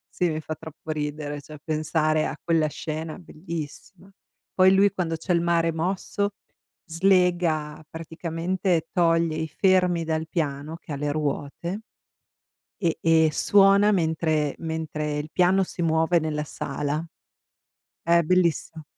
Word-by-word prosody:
Sì, 180 - 0
mi 155 - -3
fa 155 0 -6
troppo 160 0 -10
ridere, 150 -1 -3
cioè, 150 +2 -12
pensare 155 0 +1
a - - -4
quella 165 -2 +2
scena, 155 +1 -5
bellissima. 170 +3 -8 0.4
Poi 190 +1 +5
lui, 200 +1 +5
quando 175 -4 -2
c'è 165 +3 -2
il 170 - +3
mare 170 -1 +2
mosso, 190 +4 -1 0.6
slega 170 -4 +1
praticamente 165 +2 -2
toglie 165 -3 +2
i 160 - -2
fermi 180 0 +2
dal 160 0 -2
piano 150 -1 -3
che 155 - -8
ha - - -3
le 145 +1 -2
ruote 155 +6 -3 1.0
e 170 -5 0
e 160 -1 +4
suona 200 +4 +5
mentre 160 -4 +1
mentre 155 -2 -3
il 150 +1 -4
piano 185 +1 +3
si 175 - -6
muove 165 +1 +3
nella 150 -1 -2
sala. 145 +2 -3 1.0
È 170 0 +4
bellissimo. 170 -2 +1
160 Hz, 135 wpm, -25 LUFS, 155-175 Hz, 1.0 s, Poi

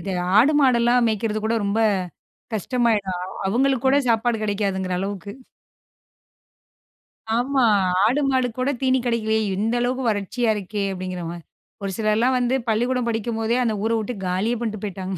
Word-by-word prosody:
இது 195 - -4 0.3
ஆடு 265 +8 +5
மாடெல்லாம் 245 -2 +4
மேய்க்கிறது 215 0 -1
கூட 225 +1 +1
ரொம்ப 200 +2 0 0.8
கஷ்டமாயிடும். 210 -4 0 0.3
அவங்களுக்கு 265 +3 +1
கூட 270 +2 +4
சாப்பாடு 230 +1 +2
கிடைக்காதுங்கிற 195 -3 -1
அளவுக்கு. 200 +1 -5 2.1
ஆமா, 265 +2 +1 0.4
ஆடு 260 +7 +2
மாடு 260 -2 +2
கூட 255 +2 0
தீனி 260 -1 +2
கிடைக்கலையே, 220 -2 +1 0.2
"இந்த 220 +4 -1
அளவுக்கு 250 +2 -1
வறட்சியா 220 +3 -1
இருக்கே" 205 0 -4
அப்படிங்கிற 185 -1 -5
மாரி. 170 -1 -9 0.4
ஒரு 195 - -2
சிலர்லாம் 225 +4 +2
வந்து 245 +1 +1
பள்ளிக்கூடம் 245 +2 0
படிக்கும்போதே 225 +1 -1
அந்த 225 -3 0
ஊரை 230 0 +1
விட்டு 220 +3 -4
காலியே 195 +6 0
பண்ணிட்டு 215 -3 -4
போய்ட்டாங்க. 190 -1 -5
225 Hz, 140 wpm, -22 LUFS, 200-245 Hz, 2.1 s, ஆடு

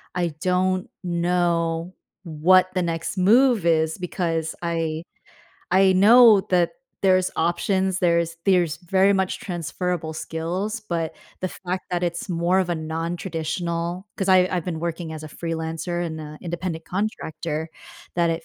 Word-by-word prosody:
I 175 -1 0
don't 185 0 +1
know 170 -1 0 0.3
what 180 +3 +4
the 185 - 0
next 165 +2 -3
move 225 +1 +4
is 160 -1 +2
because 165 -3 -2
I 165 -1 -2 0.7
I 190 +1 +5
know 215 +1 +7
that 175 -2 +3 0.3
there's 185 -1 +3
options, 190 +2 +1
there's 170 -2 +1
there's 175 -5 +3
very 190 +2 +3
much 190 -1 0
transferable 175 -2 -3
skills, 180 +8 -3
but 165 -5 -3 0.3
the 185 - -1
fact 185 +1 -5
that 175 0 -1
it's 170 -1 -2
more 175 +2 +2
of 180 -1 -1
a - - +1
non-traditional 170 +2 -3
'cause 195 - -2
I 185 -1 +6
I've 175 -3 -1
been 165 -3 -4
working 170 -1 -4
as 155 0 -7
a 155 - -7
freelancer 165 +2 -3
and, 160 -1 -5
uh, 150 0 -9
independent 170 -1 -4
contractor, 165 -5 -3 0.5
that 170 -1 +2
it 165 - -3
175 Hz, 145 wpm, -23 LUFS, 165-185 Hz, 0.7 s, know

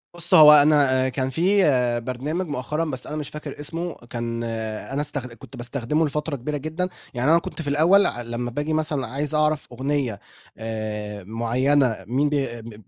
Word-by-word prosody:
بُصّ، 170 - +3
هو 150 -1 +10
أنا 145 -3 +5
آآ، - - +1
كان 130 0 -2
في 190 +7 +2 0.4
برنامج 150 +9 -3
مؤخرًا 150 +3 -2
بس 130 -5 -5
أنا 150 - -5
مش 150 -2 -4
فاكر 150 -2 -8
اسمه 165 +3 -4 0.2
كان 115 -1 -3
أنا 115 +4 -4
استخد 145 -4 -3
كنت 115 - -13
باستخدمه 135 +5 -1
لفترة 150 0 -2
كبيرة 145 +4 -3
جدًا، 160 +5 -3 0.2
يعني 125 +5 +1
أنا 165 - +6
كنت 170 - -7
في 145 - -7
الأول 170 +8 +5
أ 120 - -2
لمّا 120 +1 -4
بآجي 145 +5 -2
مثلًا 150 -5 -1
عايز 145 +5 -2
أعرف 155 -1 +1
أغنية 130 -3 -2 0.4
آآ، 105 -2 -5
معيّنة 120 +4 +1
مين 135 +5 +1
بي 145 -2 0
آآ، 115 -1 -8
مب 115 -1 -10
140 Hz, 180 wpm, -23 LUFS, 120-150 Hz, 0.4 s, هو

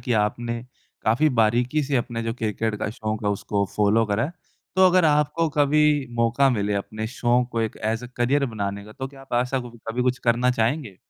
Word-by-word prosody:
कि 125 - -2
आपने 115 +3 -2 0.4
काफ़ी 120 +8 +3
बारीकी 120 +7 +2
से 140 0 0
अपने 120 -1 -2
जो 115 0 -2
क्रिकेट 110 -1 -2
का 105 - -2
शौक 110 -1 -4
है, 105 - +2
उसको 100 0 -1
फ़ॉलो 105 +2 +3
करा 105 +3 0
है। 155 - -5 0.4
तो 190 0 +7
अगर 185 -1 +4
आपको 150 +2 +2
कभी 145 +1 +4 0.4
मौका 120 +4 +3
मिले 105 -4 0
अपने 110 +2 -3
शौक 120 0 +2
को 115 - 0
एक 110 -1 -2
एज़ 115 +2 -1
ए - - -9
करियर 135 +4 +2
बनाने 100 -1 -3
का, 110 - -12
तो 130 +4 -5
क्या 135 0 -15
आप 135 -2 -7
ऐसा 125 +1 -2
कु 120 -1 -8 0.2
कभी 120 +2 -1
कुछ 125 +1 +1
करना 120 +1 +2
चाहेंगे? 120 - -1
120 Hz, 210 wpm, -24 LUFS, 110-135 Hz, 0.4 s, तो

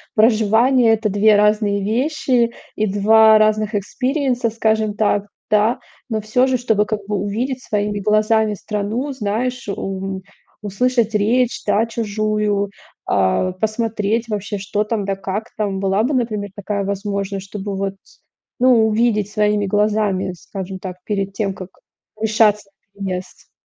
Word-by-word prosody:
проживание 225 +2 +4
это 220 -1 0
2 205 +2 +4
разные 210 -1 +2
вещи 250 +1 +1 0.2
и 215 - 0
2 220 +2 +6
разных 215 0 +2
экспириенса, 255 +3 -1
скажем 220 -1 0
так, 205 -1 +1 0.2
да. 215 +3 +2 0.3
Но 220 -2 -1
всё 220 +4 +2
же, 260 -1 +1
чтобы 220 -4 +1
как 215 0 -2
бы 210 - -1
увидеть 235 +7 -2
своими 205 0 -1
глазами 215 +1 +2
страну, 210 +7 -3
знаешь, 245 +1 -2
м, 195 -1 -4 0.4
услышать 225 +2 0
речь 235 +4 +1
да, 220 +2 +2
чужую, 210 -2 -1 0.4
а, 100 - +1
посмотреть 220 +2 -1
вообще, 205 -1 -3
что 205 +2 -1
там, 210 -1 -2
да 195 0 -1
как 195 +3 -4
там. 200 -3 -1
Была 195 +2 +1
бы, 270 +5 0
например, 215 -5 -1
такая 205 0 -3
возможность, 200 0 -3
чтобы 200 0 -5
вот, 195 0 -2 0.6
ну 245 -3 +5
увидеть 215 -2 +1
своими 210 0 +1
глазами, 205 -2 0
скажем 190 +2 -7
так, 185 -1 -7
перед 195 -2 -2
тем, 195 -1 -2
как 185 -1 -8 0.5
решаться 215 -2 +2 0.3
на 200 -1 -6
переезд? 185 -1 -6
210 Hz, 140 wpm, -19 LUFS, 200-225 Hz, 0.6 s, 2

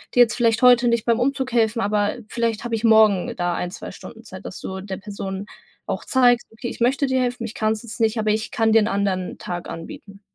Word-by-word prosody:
dir 245 - +7
jetzt 235 -1 -1
vielleicht 230 -2 +2
heute 245 -1 +6
nicht 235 -1 +1
beim 235 -1 +2
Umzug 265 0 -1
helfen, 230 -1 +1
aber 205 0 0
vielleicht 230 -1 -1
habe 240 -1 -5
ich 220 - -5
morgen 220 -4 +4
da 175 0 0
1, 180 - -3
2 - - -8
Stunden - - -12
Zeit“, - - -11
dass - - -7
du 190 0 -6
der 190 -1 -6
Person 195 -1 -6 0.4
auch - - -4
zeigst: 245 -2 +3
„Okay, 235 +2 -6
ich - - -9
möchte 265 +4 +2
dir 260 -1 +1
helfen, 245 -1 -2
ich 225 - -7
kann's 215 0 -1
jetzt 235 +1 -9
nicht, 225 +1 +2
aber 215 -1 +1
ich 215 +1 -1
kann 225 -1 +1
dir 225 - +7
'n 210 - +1
anderen 195 -3 -1
Tag 175 -1 -6
anbieten.“ 195 +4 -9
225 Hz, 240 wpm, -22 LUFS, 200-240 Hz, 0.4 s, dir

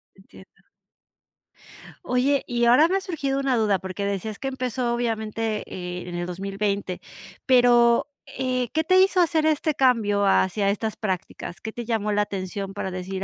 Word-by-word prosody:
Entiendo. - - -18 1.4
Oye, 265 +3 +1
y 240 -1 +1
ahora 255 +7 +6
me 380 - +1
ha - - -3
surgido 285 -8 -2
una 270 -2 +1
duda, 210 -3 +2
porque 190 +1 -5
decías 200 +1 -4
que 270 - -4
empezó 255 -2 -2
obviamente, 225 -2 -2
eh, 180 0 -6
en 175 - -6
el 175 - -2
2020, 195 +1 -3 0.5
pero, 240 -2 +5 0.2
eh, 255 -2 -2
¿qué 320 +1 +1
te 370 +3 +4
hizo 380 0 +4
hacer 315 -1 +2
este 310 -1 +1
cambio 220 -7 +2
hacia 195 +1 +2
estas 220 +1 -3
prácticas?, 185 -3 -5
¿qué 220 - -5
te 240 +1 -6
llamó 220 -2 -1
la 210 0 +2
atención 195 0 -5
para 195 - -4
decir 185 +1 -5
220 Hz, 165 wpm, -24 LUFS, 195-255 Hz, 1.4 s, ahora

